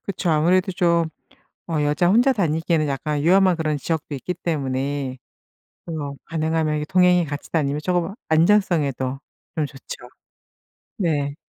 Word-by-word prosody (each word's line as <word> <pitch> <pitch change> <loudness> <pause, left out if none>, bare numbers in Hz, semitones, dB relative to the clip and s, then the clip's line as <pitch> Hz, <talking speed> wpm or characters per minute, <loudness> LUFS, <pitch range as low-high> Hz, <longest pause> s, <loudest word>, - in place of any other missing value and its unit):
그쵸. 185 -3 -1
아무래도 180 +5 +2
좀 170 -2 +2 0.6
어 160 -3 0
여자 150 +4 +2
혼자 245 +6 +4
다니기에는 165 - 0
약간 145 +1 -2
위험한 185 +2 +4
그런 155 -2 -1
지역도 155 +1 -3
있기 180 +7 -4
때문에 140 -5 -2 0.7
어 150 -4 -4
가능하면 160 -1 0
이 150 - -3
동행이 180 0 +4
같이 145 -1 -7
다니면 150 -2 0
쪼금 180 +1 0 0.2
안정성에도 160 -7 +2 0.4
좀 155 -2 0
좋죠. 135 -3 -10 0.9
네. 145 -6 0
160 Hz, 300 characters per minute, -22 LUFS, 145-175 Hz, 0.9 s, 혼자